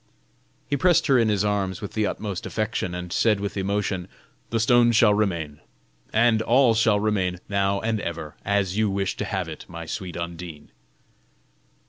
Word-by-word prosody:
He 145 - 0
pressed 175 +4 +3
her 135 -2 +4
in 115 -2 +3
his 105 -1 +1
arms 100 -3 -1
with 100 - -7
the 110 -1 +1
utmost 100 -4 -4
affection, 110 -5 -2
and 90 0 -5
said 105 -1 +2
with 100 0 -4
emotion: 100 -2 -1 0.4
"The 115 - 0
stone 120 +1 +4
shall 110 -2 +5
remain, 85 -8 -1 0.5
and 115 0 +3
all 120 +1 +4
shall 110 -2 +3
remain, 100 -4 0
now 100 0 +1
and 110 -1 -1
ever, 80 -5 -5
as 100 -2 0
you 110 -1 +2
wish 95 0 -1
to - - -2
have 95 -5 -2
it, 80 -2 -8
my 85 -2 -8
sweet 90 +1 -5
Undine." 85 -3 -7
100 Hz, 170 wpm, -24 LUFS, 90-110 Hz, 0.5 s, shall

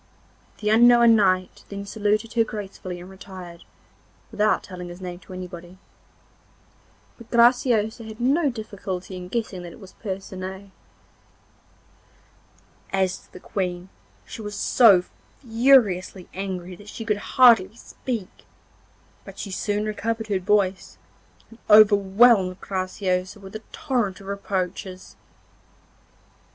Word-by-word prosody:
The 210 0 +1
unknown 235 0 +6
knight 185 -3 +1
then 200 0 -6
saluted 215 +2 -1
her 230 -1 +3
gracefully 195 -4 -7
and 175 - -10
retired, 185 -3 -11 0.7
without 215 +1 +1
telling 180 -2 -8
his 175 +1 -10
name 180 -1 -7
to 185 - -13
anybody. 180 0 -9 1.4
But 235 - -14
Graciosa 235 -2 +3
had 220 +1 -10
no 280 +5 +2
difficulty 200 -5 -6
in 180 0 -7
guessing 205 -3 -3
that 175 -1 -9
it - - -15
was 195 -3 -13
Percinet. 190 -1 -7 2.2
As 190 -1 +1
to - - -24
the - - -11
Queen, 180 -1 -4 0.4
she - - -9
was 210 -1 -6
so 200 -4 +5 0.4
furiously 225 -7 +3
angry 185 -1 -5
that 205 +2 -13
she 225 - -7
could 210 -2 0 0.2
hardly 225 -6 +6
speak; 230 -4 -7 0.8
but - - -12
she 200 - -6
soon 205 +2 -2
recovered 220 +1 -3
her 195 -2 +1
voice, 195 -1 0 0.5
and 230 - -16
overwhelmed 205 -1 +5
Graciosa 185 0 -3
with 195 +1 -12
a 220 - -6
torrent 240 -10 -2
of 195 - -13
reproaches. 190 -2 -4
200 Hz, 120 wpm, -24 LUFS, 185-220 Hz, 2.2 s, unknown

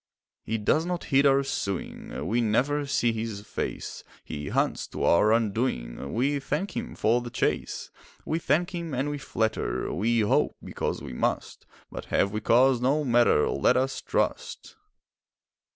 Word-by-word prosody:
He 115 - -2
does 110 +9 +2
not 175 0 -3
heed 140 +1 +6
our 135 0 +4
suing, 100 - -4
We 115 +7 +1
never 140 +6 +1
see 140 -4 +2
his 110 -2 -4
face; 105 - -5 0.2
He 75 -1 -6
hunts - - 0
to - - -5
our 105 +5 +4
undoing, 105 - -1
We 140 +4 +1
thank 150 +8 -3
him 235 0 -4
for 120 +3 +2
the 120 - -6
chase. - - -2 0.3
We 160 - -1
thank 175 +3 +1
him 170 -5 -4
and 135 +4 -1
we 145 - -4
flatter, 110 -5 -1
We 115 +5 +1
hope—because 105 - -1
we - - -7
must— - - -2 0.2
But - - -7
have 100 - +1
we 110 +1 -3
cause? 125 +3 +4
No 140 +4 +2
matter! 120 - +4
Let 70 - +2
us 135 +1 -1
trust! - - -2
120 Hz, 155 wpm, -27 LUFS, 110-145 Hz, 0.3 s, heed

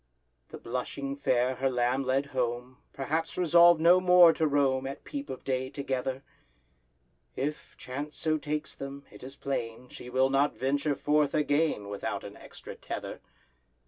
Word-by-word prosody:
The - - -8
blushing 135 +3 -4
Fair 130 -2 +1
her 135 +1 +1
lamb 125 +1 0
led 135 +2 +1
home, 125 0 -2
Perhaps 155 +4 -3
resolved 170 -1 +6
no 175 +3 +6
more 180 -2 +7
to 160 - +1
roam 135 -2 +1
At 135 - -7
peep 285 -1 -6
of 130 - -7
day 130 -1 -2
together; 135 -1 -3 1.1
If 150 +3 -4
chance 145 +4 -6
so 155 -1 0
takes 150 0 -4
them, 140 +1 -8
it - - -14
is 135 +2 -9
plain 125 -3 -4
She 125 - -10
will 130 +1 +2
not 140 +2 +2
venture 140 +2 0
forth 150 0 +1
again 150 -7 +1
Without 100 0 -4
an - - -9
extra - - -11
tether. - - -7
140 Hz, 155 wpm, -29 LUFS, 130-150 Hz, 1.1 s, more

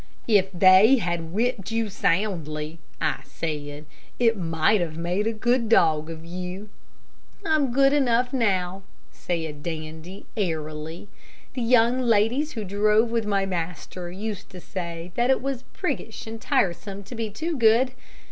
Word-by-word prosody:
"If 195 -4 +3
they 190 +6 +7
had 170 -7 -2
whipped 215 -1 -1
you 225 0 0
soundly," 165 -5 -1 0.2
I - - 0
said, 150 -2 -5 0.3
"it 230 -2 +3
might 170 +2 +2
have 160 -2 -3
made 180 +5 -1
a - - +2
good 235 +1 +1
dog 160 -7 +4
of 165 0 -8
you." 180 +4 -6 0.8
"I'm 305 -5 +2
good 275 +2 +4
enough 250 -3 +2
now," 190 -6 0 0.3
said 160 -4 -4
Dandy, 160 +3 -7
airily. 160 -2 -3 0.5
"The 255 - -3
young 240 +1 +4
ladies 240 +6 +2
who 220 - -4
drove 210 +3 +2
with 230 -2 0
my 200 -1 +1
master 175 0 -5
used 205 +1 -5
to 185 - -10
say 170 -2 -6
that 240 +4 +1
it 265 - +4
was 270 -1 -4
priggish - - -4
and 225 0 -7
tiresome 195 +2 0
to 200 - -10
be 225 -2 -3
too 315 +11 -3
good. 235 +1 +4
200 Hz, 145 wpm, -25 LUFS, 170-230 Hz, 0.8 s, they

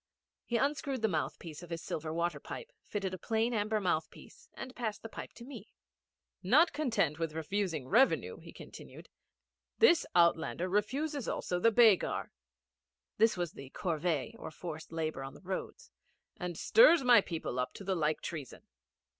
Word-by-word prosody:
He 235 - 0
unscrewed 275 -2 -1
the - - +5
mouthpiece 160 -2 -4
of 175 - -11
his 165 -1 -5
silver 155 0 -4
water 170 +1 -1
pipe, - - -8
fitted 195 -3 -4
a 185 - -5
plain 225 +2 0
amber 215 0 0
mouthpiece, 185 - -4
and 260 0 -8
passed 220 -4 -4
his 225 - -8
pipe - - -8
to 235 - -11
me. 280 - -10 0.7
'Not 290 - +4
content 215 - 0
with 165 -2 -2
refusing 160 -3 -2
revenue,' 245 - +3
he - - -12
continued, - - -12 0.7
'this 345 -7 +5
outlander 170 +1 +3
refuses 265 +8 -1
also 180 - -2
the 230 +5 +4
begar' 220 -4 +4 0.9
(this 220 -2 +4
was 175 -2 -2
the 135 -1 -11
corvée 165 -5 -1
or - - -6
forced 160 0 -8
labour 155 -4 -3
on 135 - -8
the - - -14
roads) 190 0 -6 0.4
'and 175 -2 -5
stirs 435 - +6
my 245 -2 +7
people 160 -7 -4
up 125 - -1
to - - -8
the 195 0 -1
like 155 -3 0
treason. 150 -6 -7
190 Hz, 165 wpm, -32 LUFS, 165-235 Hz, 0.9 s, my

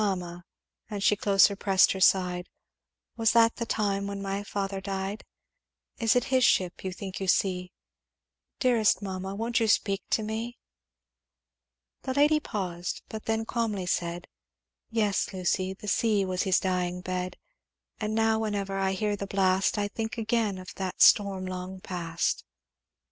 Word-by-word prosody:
"'Mamma' 180 -3 -3 0.5
and 205 -2 -4
she 210 - +4
closer 200 0 +4
pressed 195 -1 +4
her 190 - -3
side, 180 -2 +3 0.7
'Was 225 -1 +3
that 230 -1 +4
the 235 - -3
time 200 -2 0
when 200 0 -4
my 195 0 -3
father 195 -1 -3
died? 195 +2 -4 0.8
Is 225 0 +3
it 245 - +3
his 255 -1 +4
ship 185 -6 +2
you 190 - -3
think 190 +1 -7
you 190 - -3
see? 180 -1 +1 0.9
Dearest 230 -5 +3
mamma 190 0 -4
won't 230 +3 0
you 225 - +1
speak 200 -1 +2
to 220 - +1
me?' 225 +3 -4 1.4
"The 260 - -3
lady 300 +2 +4
paused, 180 - -4
but 220 -1 -7
then 225 0 0
calmly 220 -6 -2
said, 175 0 -2 0.6
'Yes, 215 -3 0
Lucy 185 +1 -1
the 210 - -11
sea 205 -1 +2
was 185 -1 -1
his 190 -1 +3
dying 180 -1 -1
bed, 180 0 -4 0.6
And 215 0 -2
now 225 0 +2
whenever 200 -3 -2
I 190 0 +1
hear 210 +1 -1
the 200 0 -5
blast 190 0 +2
I 205 0 0
think 220 +3 -5
again 220 -3 0
of 185 +2 -9
that 190 -1 -4
storm 195 -3 +5
long 185 0 -6
past. 170 -3 -2
195 Hz, 155 wpm, -28 LUFS, 185-220 Hz, 1.4 s, storm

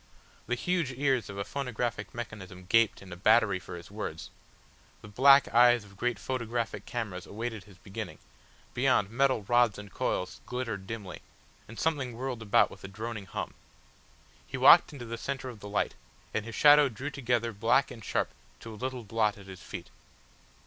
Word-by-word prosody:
The 120 - 0
huge 170 0 0
ears 130 -3 +1
of 100 - -7
a 100 - -3
phonographic 120 -6 -3
mechanism 100 -6 -8
gaped 115 +1 +3
in 95 -2 -9
a - - -7
battery 105 0 +4
for 90 0 -9
his 85 +2 -12
words, 80 -8 -6 0.7
the - - -9
black 135 +5 +6
eyes 120 +1 +5
of 100 -1 -16
great 120 +2 -1
photographic 120 -1 -3
cameras 110 -7 -4
awaited 110 -1 -5
his 100 -4 -17
beginning, 100 +1 -7 0.6
beyond 100 - +2
metal 130 -2 +2
rods 120 -1 +3
and 105 -1 -10
coils 90 - -2
glittered 115 -6 -4
dimly, 100 -5 -6 0.5
and 115 - -10
something 140 -7 -1
whirled 125 -2 -4
about 115 +2 +3
with - - -13
a - - -5
droning 105 +1 -6
hum. - - -5 0.9
He - - -5
walked - - +8
into 135 -5 -8
the 115 0 -6
centre 135 0 -4
of 115 -4 -10
the 105 - -9
light, 100 - 0 0.4
and 110 - -1
his 115 - -7
shadow 145 -1 +7
drew 130 +5 -6
together 120 -4 -1
black 115 +6 +2
and 115 -3 -10
sharp - - -1 0.3
to 115 - -8
a 105 - -11
little 130 -1 -3
blot 105 0 0
at 100 - -13
his 95 -2 -10
feet. - - -8
115 Hz, 180 wpm, -29 LUFS, 100-125 Hz, 0.9 s, walked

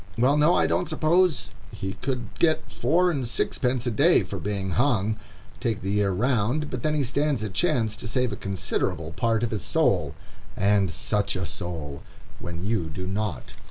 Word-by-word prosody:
Well, 130 +5 +4
no, 150 +4 +4
I - - +3
don't - - 0
suppose 165 +2 +2 0.2
he 95 0 -4
could 125 -4 -2
get 160 -2 +2
four 170 +9 +2
and 135 -6 -2
sixpence 125 +1 0
a 120 - 0
day 110 - +4
for - - -6
being 100 -2 -2
hung, 110 -3 +2 0.4
take 115 -6 -2
the 95 - -1
year 105 -1 +2
round; 125 +7 0
but 125 - -3
then 155 +3 +1
he 145 - +1
stands 140 -1 0
a 105 - -2
chance 115 - +1
to - - -6
save 125 -1 0
a - - -2
considerable 90 -4 -2
part 115 +4 0
of 120 - -1
his 105 -7 -2
soul,—and 100 -1 0
such 100 +6 -1
a 90 -1 -2
soul!—when 85 +1 -7
you 100 -7 0
do 90 +4 -5
not. 95 - -3
110 Hz, 175 wpm, -25 LUFS, 95-135 Hz, 0.4 s, Well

